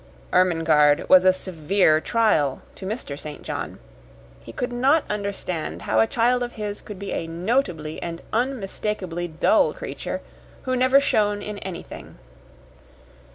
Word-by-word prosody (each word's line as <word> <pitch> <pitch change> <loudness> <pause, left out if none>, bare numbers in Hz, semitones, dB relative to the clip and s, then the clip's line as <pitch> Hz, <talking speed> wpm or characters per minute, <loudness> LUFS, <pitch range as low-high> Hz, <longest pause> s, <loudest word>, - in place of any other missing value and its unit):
Ermengarde 160 -5 +4
was 185 0 +7
a 185 - +8
severe 180 -2 +1
trial 185 - +1
to 190 - -8
Mr. 195 - -5
St. 150 -1 -8
John. - - -5 0.6
He 115 - -11
could 245 - -3
not 275 +6 +3
understand 180 - -4
how 110 - +1
a 110 - +5
child 245 +2 +2
of 245 0 -3
his 210 -2 -5
could 210 - -9
be 200 +1 -6
a 165 - -3
notably 170 - -1
and 170 -1 -6
unmistakably 210 -7 -2
dull 160 -1 +3
creature - - -5 0.4
who 255 0 -1
never 255 +2 +5
shone 210 -6 +1
in 210 -1 -6
anything. 185 -3 -8
190 Hz, 140 wpm, -24 LUFS, 165-225 Hz, 0.6 s, a